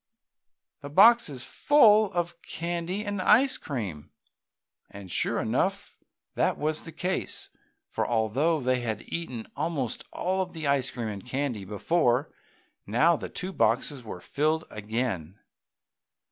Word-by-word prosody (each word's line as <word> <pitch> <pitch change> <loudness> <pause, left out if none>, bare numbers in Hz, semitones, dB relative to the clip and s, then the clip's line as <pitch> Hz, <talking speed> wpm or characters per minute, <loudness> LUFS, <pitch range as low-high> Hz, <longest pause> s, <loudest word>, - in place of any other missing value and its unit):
The 145 - -8
box 225 +7 +6
is 130 -3 -6
full 215 - +5
of 175 -1 -2
candy 175 +4 -3
and 205 -2 -2
ice 255 +8 +5
cream!" 100 - -5 0.8
And 100 -3 -10
sure - - 0
enough - - -1 0.4
that - - +1
was 155 +1 -1
the 165 - -8
case, 180 +4 -2 0.4
for - - -2
although 125 +8 +1
they 130 0 +1
had 115 -3 -3
eaten 130 -10 -5
almost 145 -4 -2
all 190 +1 -1
of 185 - -4
the 160 -2 -5
ice 140 -2 +2
cream 120 -3 -4
and 100 -2 -6
candy 125 -5 -3
before 125 - +1 0.5
now 150 +11 +4
the - - -6
two 185 +1 -5
boxes 140 -7 +1
were 90 -5 -8
filled 155 - 0
again. 105 -5 -3
145 Hz, 135 wpm, -27 LUFS, 115-175 Hz, 0.8 s, box